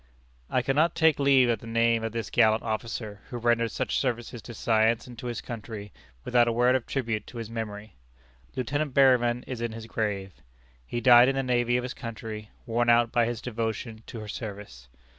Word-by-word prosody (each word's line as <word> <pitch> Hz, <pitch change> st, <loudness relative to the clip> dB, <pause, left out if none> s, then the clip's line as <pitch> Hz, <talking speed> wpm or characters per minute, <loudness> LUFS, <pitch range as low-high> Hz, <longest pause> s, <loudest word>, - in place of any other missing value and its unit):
I 125 Hz, -, +1 dB
cannot 150 Hz, +6 st, +2 dB
take 160 Hz, -2 st, +3 dB
leave 135 Hz, -2 st, +5 dB
of 115 Hz, -, +1 dB
the 115 Hz, -, -11 dB
name 115 Hz, 0 st, +2 dB
of 115 Hz, -, -2 dB
this 115 Hz, -1 st, -4 dB
gallant 110 Hz, 0 st, +4 dB
officer, 110 Hz, -2 st, -4 dB
who 120 Hz, -, -5 dB
rendered 120 Hz, -1 st, +2 dB
such -, -, -1 dB
services 120 Hz, -2 st, -3 dB
to 120 Hz, -, -10 dB
science 110 Hz, +1 st, +2 dB
and 125 Hz, -, -11 dB
to 125 Hz, -, -6 dB
his 120 Hz, -, -4 dB
country, 110 Hz, -3 st, -7 dB, 0.3 s
without 120 Hz, -1 st, +3 dB
a -, -, +2 dB
word 120 Hz, +2 st, +3 dB
of 130 Hz, -, -2 dB
tribute 115 Hz, -6 st, -2 dB
to 120 Hz, -, -10 dB
his 115 Hz, -1 st, -6 dB
memory. 105 Hz, -, -6 dB, 0.6 s
Lieutenant 140 Hz, +3 st, -2 dB
Berryman 125 Hz, -3 st, +4 dB
is 125 Hz, -3 st, -6 dB
in 120 Hz, -1 st, -2 dB
his 115 Hz, 0 st, -8 dB
grave. 105 Hz, -4 st, -3 dB, 0.5 s
He 120 Hz, -, -3 dB
died 120 Hz, +1 st, +7 dB
in 135 Hz, -, 0 dB
the 135 Hz, -, 0 dB
navy 120 Hz, -1 st, +1 dB
of 125 Hz, -, -2 dB
his 125 Hz, -, -4 dB
country, 110 Hz, -3 st, -7 dB, 0.2 s
worn 120 Hz, +1 st, +1 dB
out 120 Hz, -1 st, +4 dB
by 120 Hz, -1 st, +2 dB
his 120 Hz, -1 st, -4 dB
devotion 115 Hz, -1 st, -4 dB
to 120 Hz, -, -7 dB
her 105 Hz, -, -8 dB
service. 100 Hz, -, -8 dB
115 Hz, 200 wpm, -27 LUFS, 110-125 Hz, 0.6 s, died